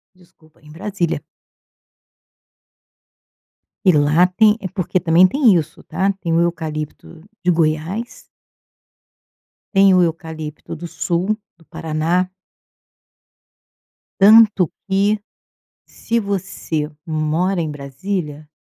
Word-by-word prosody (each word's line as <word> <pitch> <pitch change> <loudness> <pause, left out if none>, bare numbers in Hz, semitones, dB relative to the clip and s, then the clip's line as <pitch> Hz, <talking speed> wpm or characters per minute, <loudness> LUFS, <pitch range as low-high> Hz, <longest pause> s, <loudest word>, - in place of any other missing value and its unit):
Desculpa, 165 -3 -25
em 150 0 -16
Brasília. 180 0 -3 2.6
E 185 - +7
lá 150 +4 +4
tem 210 +4 +3
é 200 - -4
porque 185 -1 -1
também 170 +1 +5
tem 245 -2 +4
isso 155 -2 -2
tá, 195 +3 0
tem 165 -2 -1
o 165 - +3
eucalipto 160 -1 -4 0.2
de 180 - +1
Goiás. 165 +7 -1 1.5
Tem 195 -1 +5
o 185 - +5
eucalipto 160 -2 -4
do 170 +2 -7
Sul, 170 +5 -1 0.2
do 165 - -23
Paraná. 165 +4 -1 1.9
Tanto 210 -3 +6 0.2
que, 200 +2 +1 0.7
se 230 0 -2
você 190 -6 -3 0.2
mora 160 +4 0
em 160 -2 -2
Brasília 150 +2 -5
170 Hz, 100 wpm, -19 LUFS, 155-195 Hz, 2.6 s, E